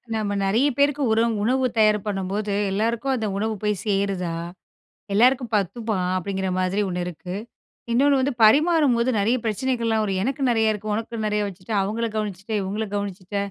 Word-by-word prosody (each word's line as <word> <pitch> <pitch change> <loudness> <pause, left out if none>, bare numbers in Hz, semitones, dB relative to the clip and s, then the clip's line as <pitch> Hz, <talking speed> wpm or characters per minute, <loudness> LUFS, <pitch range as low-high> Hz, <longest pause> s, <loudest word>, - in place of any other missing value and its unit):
நம்ம 205 -2 -1
நிறைய 215 +8 +2
பேருக்கு 285 +1 +2
உரம் 225 0 +2
உணவு 255 +4 +2
தயார் 215 -1 +5
பண்ணும்போது 200 +1 -2 0.2
எல்லோருக்கும் 230 +6 0
அந்த 225 -4 -1
உணவு 220 +2 -1
போய் 210 0 +2
சேருதா? 195 -4 0 0.8
எல்லாருக்கும் 245 +2 +3
பத்துமா? 210 +2 -1 0.2
அப்படிங்கிற 190 +1 -3
மாதிரி 185 +3 0
ஒண்ணு 180 -1 -2
இருக்கு. 180 +1 -7 0.6
இன்னொண்ணு 275 +3 +4
வந்து 280 +1 0
பரிமாறும்போது 275 -1 +4
நெறைய 230 +5 +2
பிரச்சனைகள்லாம் 230 -1 0
வரும். 195 -2 -1
எனக்கு 270 +3 -2
நெறைய 220 -2 +3
இருக்கு. 210 +1 -5
உனக்கு 225 0 -4
நெறைய 210 0 0
வச்சுட்டு 195 +3 -7
அவங்கள 220 +4 -1
கவனிச்சிட்ட, 210 0 -4
இவங்கள 205 +3 -3
கவனிச்சிட்ட, 200 -1 -5
215 Hz, 150 wpm, -23 LUFS, 195-235 Hz, 0.8 s, தயார்